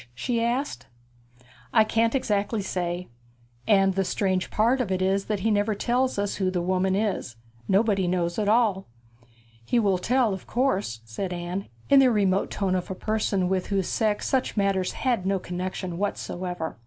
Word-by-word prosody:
she 230 - -1
asked. 250 +5 -2 0.9
'I 220 - +6
can't 230 +3 +1
exactly 210 -3 0
say. 180 -1 -3 0.6
And 195 -2 +4
the 195 +1 +1
strange 185 0 -1
part 235 +5 +2
of 210 -6 -2
it 185 - 0
is 195 +1 +1
that 210 -3 -2
he 225 - +1
never 205 +1 +1
tells 250 +4 0
us 200 0 -1
who 190 -2 +1
the 185 -1 -1
woman 185 +2 +1
is. 195 - -1 0.3
Nobody 195 -2 +2
knows 175 +1 0
at 205 -1 +1
all.' 215 -4 +2 0.8
'He 180 - 0
will 200 -5 +2
tell, 240 +2 +2
of 190 - -8
course?' 205 - 0
said 180 - -4
Anne, 175 +2 -4 0.2
in 280 - +6
the 265 -1 +6
remote 200 -4 +2
tone 195 -2 -1
of 185 -1 -2
a 190 - -3
person 205 -2 0
with 185 0 -1
whose 195 -3 0
sex 215 -2 0
such 260 -3 0
matters 195 -2 +1
had 245 -7 0
no 195 0 +2
connexion 180 -1 -4
whatever. 180 - -4
195 Hz, 175 wpm, -26 LUFS, 185-220 Hz, 0.9 s, I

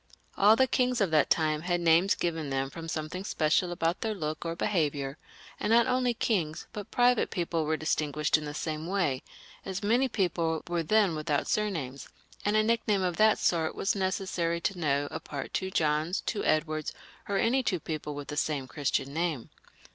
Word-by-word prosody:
All 210 +2 +6
the 260 - +4
kings 250 -1 +1
of 195 -5 +1
that 155 -2 +3
time 155 -2 +2
had 175 +1 0
names 170 +3 +4
given 165 -4 -2
them 135 0 -1
from 165 +2 -7
something 160 +3 -4
special 165 -1 +1
about 170 0 -1
their 220 -1 -1
look 155 -4 -4
or 165 0 -3
behaviour, 150 -7 -1 0.4
and 210 - -1
not 235 0 +6
only 250 -1 +1
kings 175 -10 -1
but 210 -3 -7
private 245 -1 +3
people 170 -3 -1
were 155 +1 0
distinguished 150 -1 0
in 155 -1 0
the 145 - -5
same 155 0 -3
way, 175 -9 0 0.4
as 190 +2 -5
many 240 +6 +3
people 165 -6 0
were 175 -1 0
then 200 +2 +3
without 155 -2 -1
surnames, 160 -11 -2 0.3
and 205 +1 +1
a 215 - +4
nickname 215 -3 +1
of 180 -2 -1
that 215 0 +5
sort 165 -2 +1
was 195 - 0
necessary 185 -3 -1
to 190 0 -2
know 145 -3 +1
apart 140 -2 -6
two 190 - -1
Johns, 155 +1 0
two 210 - -2
Edwards, 155 -1 0 0.4
or 200 - +1
any 245 +6 +2
two 185 -8 -1
people 150 -1 -5
with 145 -1 -7
the 150 - -5
same 145 -4 -1
Christian 140 -1 -1
name. 160 -6 -2
170 Hz, 185 wpm, -29 LUFS, 155-200 Hz, 0.4 s, All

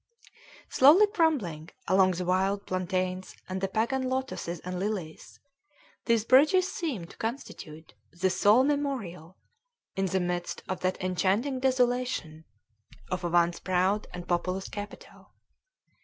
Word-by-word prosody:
Slowly 305 +11 +7
crumbling 280 - 0 0.2
among 185 0 +4
the 180 +1 -4
wild 190 +2 0
plantains 185 0 -2
and 185 0 -4
the 195 - 0
pagan 235 +6 -1
lotoses 260 -10 -3
and 180 0 -4
lilies, 190 -6 -5 0.7
these 230 -2 +2
bridges 300 +9 +5
seem 270 - -3
to - - -15
constitute 170 - -7 0.2
the 185 +2 0
sole 205 +7 +4
memorial, 250 - -3 0.6
in 195 0 0
the 190 +1 0
midst 175 -1 -3
of 185 - -3
that 185 0 -1
enchanting 195 +9 0
desolation, 250 -11 0 0.7
of 185 0 -2
a 175 - -1
once 170 0 +2
proud 185 +3 0
and 175 -1 -8
populous 180 +2 -1
capital. 205 0 -10
190 Hz, 125 wpm, -28 LUFS, 180-255 Hz, 0.7 s, Slowly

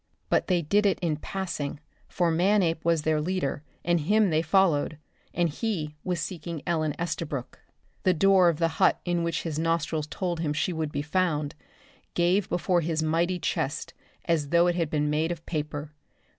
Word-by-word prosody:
But - - +2
they 180 -3 +2
did 205 +7 +3
it 195 - +2
in 160 -4 0
passing, 160 -5 -4 0.3
for 175 -2 +1
Manape 175 -1 +2
was 165 -2 +2
their 155 -1 +1
leader, 160 -4 -1 0.2
and 175 0 +3
him 205 +5 +3
they 155 0 +3
followed 165 -3 +2 0.3
and 175 0 +1
he 160 -3 -3
was 180 -2 -1
seeking 165 -3 -5
Ellen 155 -4 0
Estabrook. 150 -6 -4 0.4
The 185 -2 +3
door 190 +1 +5
of 165 - -1
the 165 0 +2
hut - - +5
in 175 -1 0
which 170 0 -1
his 155 -2 -3
nostrils 165 -2 0
told 175 +1 -3
him 155 -3 0
she 165 +4 0
would 160 -2 -2
be 145 0 -2
found, 155 -3 0 0.6
gave 180 +3 +2
before 175 0 +1
his 160 -1 -1
mighty 170 +3 +1
chest 145 -4 -2 0.3
as 160 -4 +1
though 170 +2 +5
it 175 - +3
had 170 -3 -1
been 150 -1 0
made 155 +3 +1
of 170 -1 -6
paper. 150 -2 -4
165 Hz, 180 wpm, -27 LUFS, 155-180 Hz, 0.6 s, door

